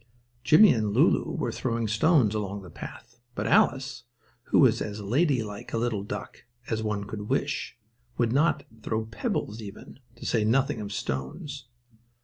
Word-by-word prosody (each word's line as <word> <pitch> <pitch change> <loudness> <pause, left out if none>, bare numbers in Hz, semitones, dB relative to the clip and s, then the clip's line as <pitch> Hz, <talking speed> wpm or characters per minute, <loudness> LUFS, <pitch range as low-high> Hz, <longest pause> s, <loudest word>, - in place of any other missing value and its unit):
Jimmie 155 - +7
and 110 -3 -1
Lulu - - +3
were - - -1
throwing 115 -2 -1
stones 110 - +3
along 100 -2 -3
the 90 - -11
path, 120 +8 -10 0.2
but 100 - -2
Alice, 130 +1 +2 0.4
who - - +2
was 120 -4 +5
as 105 0 -4
ladylike 115 - 0
a - - +1
little 115 -3 0
duck 100 - -7 0.2
as 110 -1 -1
one 105 -2 -2
could 105 0 -7
wish, 135 -2 -1 0.4
would 120 -1 +1
not 155 +5 +2 0.2
throw 110 0 -2
pebbles 110 -1 -3
even, 100 +5 -10 0.2
to 120 - -11
say 115 -3 +1
nothing 135 +2 +1
of 100 -1 -6
stones. 100 - -4
115 Hz, 155 wpm, -27 LUFS, 105-130 Hz, 0.4 s, Jimmie